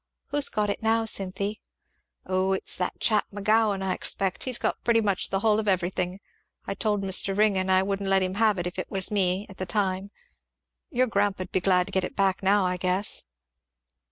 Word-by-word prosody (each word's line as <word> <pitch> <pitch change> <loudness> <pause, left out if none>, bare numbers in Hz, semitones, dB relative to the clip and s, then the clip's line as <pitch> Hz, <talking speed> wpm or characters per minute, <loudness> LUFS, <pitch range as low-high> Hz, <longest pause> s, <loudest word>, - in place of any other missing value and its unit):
"Who's 290 0 +2
got 210 -1 -1
it - - -5
now, 225 0 +1
Cynthy?" 200 0 -1 0.6
"O 185 +1 0
it's 190 - +1
that 180 - -3
chap 215 -2 +1
McGowan, 205 0 +1
I 190 -1 0
expect; 190 0 0
he's 255 -2 +2
got - - -2
pretty 235 -1 +3
much 200 -4 -1
the 195 - -1
hull 215 -1 +3
of 215 - -3
everything. 185 0 -1 0.5
I - - -3
told 210 -2 -1
Mr. 195 0 +2
Ringgan 195 -3 +2
I 185 0 +4
wouldn't 195 0 -2
let 195 -1 +3
him 185 0 -2
have 215 -3 +3
it 175 - -3
if 180 +1 -5
it - - -5
was 190 0 +1
me, 190 -1 +1
at 195 - -14
the 185 - -4
time. 195 -2 -1 0.8
Your 255 +1 +1
grandpa'd 200 -5 -1
be - - +1
glad 180 -1 +3
to - - -10
get 190 - 0
it - - -5
back 195 -1 +1
now, 195 0 +3
I 180 0 -1
guess." 185 - +1
195 Hz, 205 wpm, -26 LUFS, 185-210 Hz, 0.8 s, I